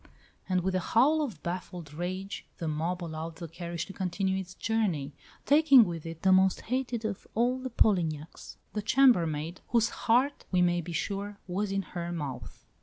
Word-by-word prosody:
And 185 -1 +2
with 190 +1 -1
a 185 - +2
howl 275 - +3
of 275 -8 -4
baffled 175 -3 -5
rage 185 +4 -4
the 165 - -4
mob 165 +4 -2
allowed 160 0 -5
the 170 0 -7
carriage 170 0 -5
to 195 - -10
continue 190 0 -1
its 185 -1 -8
journey, 185 -11 -1 0.3
taking 280 -5 +7
with 165 -3 -5
it 165 0 -8
the 190 - +5
most 190 0 +4
hated 245 -2 -2
of 215 -3 -4
all 245 +3 +2
the 260 0 -4
Polignacs, 165 -10 0 0.2
the 210 - -1
chambermaid, 175 - +3
whose 235 -1 +2
heart, 255 +5 +1
we 185 - +2
may 175 0 +2
be 170 +1 -7
sure, 200 +4 -3
was 195 +3 -2
in 195 0 0
her 175 -1 -5
mouth! 145 -7 -6
185 Hz, 180 wpm, -29 LUFS, 170-220 Hz, 0.3 s, taking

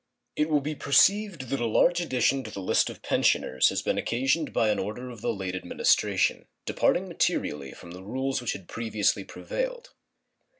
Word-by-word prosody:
It 150 +1 0
will 150 -2 +2
be 150 +3 -3
perceived 165 - +2
that 140 - -1
a 120 - 0
large 175 +10 +3
addition 135 -3 +1
to 110 - -7
the 100 - -7
list 95 - +2
of - - -11
pensioners 65 0 +2
has - - -2
been - - 0
occasioned 135 +6 0
by 110 - +2
an 105 - +1
order 125 +6 -5
of 115 -4 -11
the 120 0 0
late 95 -4 -4
Administration, 95 - +1 0.2
departing - - +1
materially 70 -3 -1
from 85 - -12
the 90 +1 -9
rules 130 +6 -2
which 120 - -2
had 95 - -10
previously 110 -3 0
prevailed. - - -5
125 Hz, 180 wpm, -27 LUFS, 105-150 Hz, 0.2 s, large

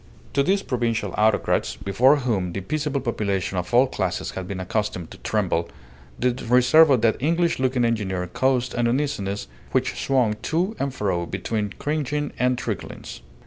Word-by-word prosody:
To 140 - +3
these 195 +7 +1
provincial 115 -6 -1
autocrats, 110 0 +1
before 105 +9 +3
whom 110 -11 -1
the 100 - -3
peaceable 145 - -2
population 100 -6 -1
of 90 - -5
all 125 +2 +6
classes 95 -8 -2
had 95 -1 -6
been 95 -1 -5
accustomed 95 -2 -3
to - - -11
tremble, - - -1 0.5
the 125 0 +1 0.2
reserve 125 +6 +6
of 130 -5 +4
that 115 -1 +3
English 170 +2 +1
looking 130 -2 +1
engineer 95 -6 -1
caused 125 +5 0
an 120 0 +1
uneasiness 115 -7 -1 0.3
which - - 0
swung 125 -6 +2
to 180 +7 -1
and 140 0 -1
fro 95 -8 -1
between 105 -3 -3
cringing 150 -1 -2
and 125 0 +2
truculence. 110 -6 -6
120 Hz, 160 wpm, -23 LUFS, 100-135 Hz, 0.5 s, all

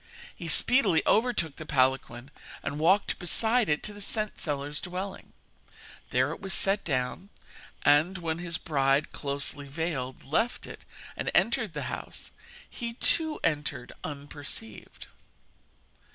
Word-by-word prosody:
He - - -7
speedily 250 -10 +5
overtook 215 - +2
the 160 - -7
palanquin 130 -1 +1 0.3
and 145 +1 -3
walked 190 +6 +3
beside 220 +6 +3
it 150 - +1
to 210 - -2
the 205 - -10
scent 215 +1 -1
seller's 145 -1 -2
dwelling. 185 +2 -6 0.8
There 130 +3 +2
it - - -6
was 195 0 -1
set 200 +1 +2
down, 135 +6 -2 0.5
and, 155 +6 +4
when 165 -2 -2
his 170 -2 -1
bride, 135 -1 +1
closely 140 0 -3
veiled, 140 -4 -3
left 225 - 0
it - - -10 0.3
and - - -2
entered - - +2
the - - -2
house, - - -6 0.4
he, 235 -1 -5
too, 315 +4 +2
entered 145 -5 -1
unperceived. 145 -6 -7
160 Hz, 130 wpm, -28 LUFS, 140-195 Hz, 0.8 s, speedily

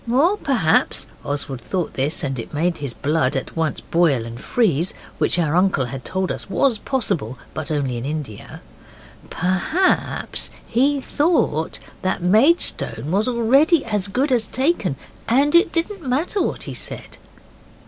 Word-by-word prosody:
Or 315 +11 +4
perhaps 240 - +1 0.2
(Oswald 140 -3 -3
thought 180 +6 -3
this, 150 +7 -1
and 135 -3 -2
it 115 - -7
made 170 +3 0
his 140 -3 -4
blood 145 +1 0
at 135 - -4
once 160 -2 -1
boil 155 -9 +2
and 115 +1 -8
freeze, 180 - +1 0.2
which - - +3
our 165 -2 +1
uncle 180 -7 +3
had 130 +1 -7
told 190 0 -1
us - - -3
was 230 +3 +2
possible, 195 - -2 0.2
but 155 0 -4
only 140 -5 -1
in 120 - -5
India), 145 -8 -6 0.7
perhaps 190 - 0 0.2
he 275 +5 +2
thought 290 - +1 0.2
that 185 -1 -1
Maidstone 215 - +2
was 205 +5 +1
already 270 +7 +3
as 210 -4 -1
good 260 +8 0
as 235 -3 +2
taken 260 - 0 0.3
and 275 +5 +3
it 345 +4 +5
didn't 360 +4 -2
matter 295 +10 0
what - - -2
he - - -6
said. - - -7
185 Hz, 150 wpm, -21 LUFS, -, 0.7 s, it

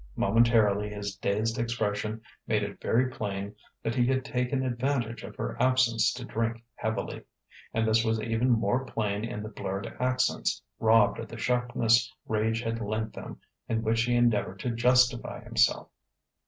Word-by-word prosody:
Momentarily 105 -1 +3
his 100 -1 -5
dazed 110 +3 -1
expression 110 -2 -2 0.3
made 105 -1 +1
it 100 0 -6
very 125 +3 +2
plain 100 -2 -4 0.3
that 115 - -1
he 120 0 +2
had 130 0 +1
taken 130 +1 -1
advantage 120 -2 -1
of - - -9
her - - -4
absence 130 -3 +3
to 125 0 -7
drink 115 0 -2
heavily. 110 0 -3 0.5
And 110 0 0
this 110 +1 +3
was 110 -1 +1
even 115 +3 0
more 120 +2 +2
plain 105 -4 -2
in 105 -2 -4
the 105 - -6
blurred 100 -2 -5
accents, 130 0 +1 0.2
robbed 110 -1 +4
of 115 - -5
the 115 - -9
sharpness 120 -1 +2 0.2
rage 110 +1 0
had 115 0 -2
lent 110 +1 -2
them, - - -9 0.3
in 115 0 0
which 115 +1 +2
he 120 +1 +1
endeavoured 120 -5 +2
to 125 - -1
justify 125 +1 +2
himself. - - +2
115 Hz, 160 wpm, -28 LUFS, 110-120 Hz, 0.5 s, robbed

